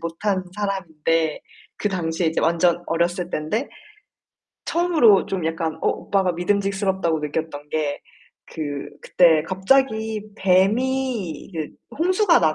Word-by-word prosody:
못한 185 +3 -2
사람인데 165 -6 -1 0.4
그 210 - -1
당시에 170 -3 -1
이제 160 - -1
완전 170 +1 +2
어렸을 175 +1 0
땐데 185 - -2 1.0
처음으로 320 - +4
좀 185 -4 -3
약간 160 -1 -1
어 - - +3
오빠가 190 -2 0
믿음직스럽다고 190 -1 0
느꼈던 150 -1 -4
게 150 -2 -1 0.5
그 - - -6 0.4
그때 165 -4 +4
갑자기 220 +2 +1 0.2
뱀이 210 - +1
그 155 -2 -3 0.3
홍수가 365 +2 +3
나 155 - +3
185 Hz, 260 characters per minute, -22 LUFS, 160-210 Hz, 1.0 s, 처음으로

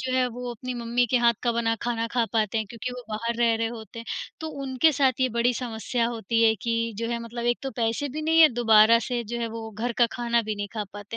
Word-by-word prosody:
जो 260 -1 -3
है 255 -1 +3
वो 245 +1 -6
अपनी 250 +2 -6
मम्मी 240 +1 0
के 255 - +4
हाथ 235 -1 +4
का 240 - +1
बना 230 -1 +1
खाना 230 -1 -1
खा 240 -2 +2
पाते 220 -1 +1
हैं 220 - -2
क्योंकि 235 +1 -5
वो 250 - -7
बाहर 230 +2 -2
रह 235 -1 +3
रहे 225 0 -1
होते 225 -1 -9
हैं। 230 - -7 0.4
तो 315 - -4 0.2
उनके 270 +4 +3
साथ 265 -3 +1
ये 255 - +3
बड़ी 245 +1 +3
समस्या 230 0 -2
होती 230 0 -1
है 220 -1 +5
कि 230 -1 -1
जो 230 - -2
है 235 - -1
मतलब 235 +1 -6
एक - - -34
तो 270 - -3
पैसे 230 +6 0
भी 305 +4 -5
नहीं 325 +1 +4
है, 315 - +9
दोबारा 225 -1 +6
से 245 -2 -1
जो 235 +3 -4
है 230 - -1
वो 225 0 -7
घर 230 +3 -3
का 240 - +6
खाना 235 -1 0
भी 215 0 -3
नहीं 205 0 -4
खा 210 -1 -2
पाते। 205 +2 -8
235 Hz, 270 wpm, -25 LUFS, 225-245 Hz, 0.4 s, है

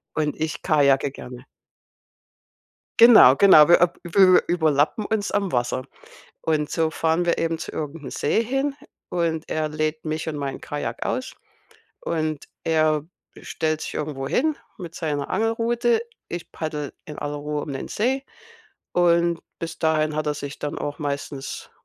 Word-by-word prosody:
und 150 -2 0
ich 160 0 -3
kajake 140 -3 +3
gerne. 125 -2 -10 1.6
Genau, 220 - +9
genau, 170 -6 +8
wir 175 - +6
ap 175 0 +3
ü 185 +1 +6
überlappen 160 +3 +2
uns 215 -2 -1
am 200 -3 -1
Wasser. 125 +1 -1 0.6
Und 150 -2 0
so 160 -1 +1
fahren 165 +2 0
wir 170 - +1
eben 165 0 -1
zu - - -6
irgend 150 0 -5
'n - - -5
See 185 +10 +1
hin 270 +4 -1 0.4
und 165 -2 -1
er 155 -1 -1
lädt 155 +1 -3
mich 155 +1 -2
und 150 - -4
mein 140 -1 -4
Kajak 145 - -4
aus. - - -3 0.6
Und 155 -3 -2 0.2
er 155 -2 +2 0.4
stellt 155 0 -2
sich - - -5
irgendwo 145 -3 -3
hin 295 - +1 0.2
mit 170 -3 -8
seiner 145 -4 -3
Angelrute. 230 +2 +1 0.3
Ich 175 -1 -6
paddle 150 -3 -4
in 150 - -9
aller 145 0 -3
Ruhe 150 0 -3
um 140 - -6
den 135 - -6
See 265 +5 0 0.7
und 170 -1 +3 0.2
bis 165 0 -6
dahin 155 -1 +1
hat 155 0 -2
er 150 - +1
sich 145 -1 -7
dann 145 - -4
auch 145 +1 -4
meistens, 140 -1 -5
155 Hz, 155 wpm, -23 LUFS, 145-175 Hz, 1.6 s, Genau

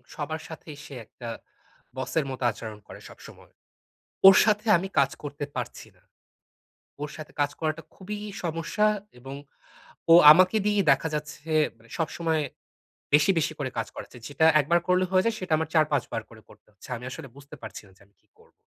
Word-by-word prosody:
সবার 155 +1 -4
সাথেই 155 -2 -10
সে 140 - -11
একটা 120 +2 -11 0.7
বসের 140 +3 -1
মতো 130 -1 -6
আচরণ 110 -2 -9
করে - - -11
সবসময়। - - -15 0.8
ওর 195 - +10
সাথে 210 0 +1
আমি 190 +3 -4
কাজ 135 - +3
করতে 145 0 -5
পারছি 125 -2 -6
না। - - -28 1.0
ওর 150 - -3
সাথে 155 -1 -9
কাজ 145 0 +1
করাটা 155 0 -2
খুবই 205 +2 -6 0.3
সমস্যা, 165 +6 0 0.3
এবং 135 +2 -8 0.8
ও - - +10 0.2
আমাকে 185 +5 +4
দিয়েই 205 -2 +2
দেখা 160 - 0
যাচ্ছে 150 +1 -6 0.3
মানে 115 0 -22
সবসময় 160 -1 -1 0.7
বেশি, 150 +5 +5
বেশি 155 0 0
করে 130 -3 -3
কাজ - - -2
করাচ্ছে। 125 - -10
যেটা 160 +3 +2
১ - - -2
বার 170 0 +5
করলে 180 0 +3
হয়ে 185 +1 +3
যায়, 230 -1 0
সেটা 185 -3 -5
আমার 160 -1 -2
৪ 155 -2 +5
৫ 140 - +2
বার 115 -2 -2
করে 110 -1 -15
করতে - - -20
হচ্ছে। 100 - -16
আমি 125 - -10
আসলে 135 - -8
বুঝতে 145 +2 -12
পারছি 110 - -8
না - - -19
যে - - -22
আমি 100 - -35
কি - - -40
করবো? - - -23
155 Hz, 185 wpm, -26 LUFS, 135-170 Hz, 1.0 s, ওর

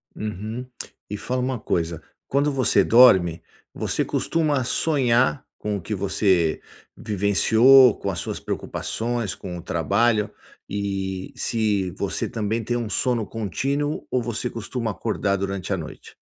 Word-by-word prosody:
Uhum, 110 +4 -5 0.4
e 105 - -4
fala 125 +4 -2
uma 125 -2 -2
coisa, 85 -3 -2 0.3
quando 140 +2 +1
você 130 -4 +3
dorme, 95 -9 +6 0.3
você - - -1
costuma 150 -5 0
sonhar 130 -1 +2
com 105 -1 -2
o 95 - -7
que 105 - -4
você 95 -4 +1 0.3
vivenciou, 110 +5 +5
com 100 - -3
as 85 - -4
suas - - -4
preocupações, 115 -2 -3
com 90 -2 -7
o - - -7
trabalho, 105 +6 +1 0.4
e 95 -2 -3
se 105 -5 0
você - - -3
também 110 +1 -2
tem 120 +2 -1
um 115 -3 -3
sono 120 -1 0
contínuo 135 +8 -2
ou 125 - +1
você 120 +1 -3
costuma 115 0 -4
acordar 100 -2 -1
durante 100 -2 -3
a - - 0
noite? - - -9
110 Hz, 140 wpm, -23 LUFS, 100-125 Hz, 0.4 s, dorme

